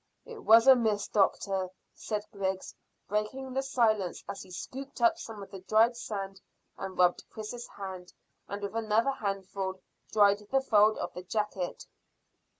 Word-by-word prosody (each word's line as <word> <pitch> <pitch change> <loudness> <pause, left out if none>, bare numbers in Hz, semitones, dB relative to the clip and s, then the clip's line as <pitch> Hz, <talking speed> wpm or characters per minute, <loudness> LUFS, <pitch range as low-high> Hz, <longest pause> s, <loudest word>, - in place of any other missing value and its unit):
"It 475 -2 -9
was 225 +1 +7
a 265 -1 +9
miss, 215 -4 +1
doctor," 195 -2 +1 0.2
said 210 -1 -4
Griggs, 190 -1 -2 0.3
breaking 230 +6 -2
the 265 - +1
silence, 220 -8 +1
as - - -5
he - - -12
scooped 270 +9 -7
up 345 -1 +4
some 220 -7 -7
of 195 - -13
the 195 - -7
dried 220 +5 +3
sand 195 -4 -5 0.3
and 190 -1 -6
rubbed 180 -1 +4
Chris's 230 +2 -7
hand, 190 -2 -8 0.4
and 200 +1 -5
with 200 +2 -4
another 225 +3 +2
handful 195 -4 -3 0.3
dried 205 -1 +5
the 270 - +3
fold 215 -4 +4
of - - -4
the 180 - -6
jacket. 190 -1 -3
210 Hz, 155 wpm, -30 LUFS, 195-230 Hz, 0.4 s, a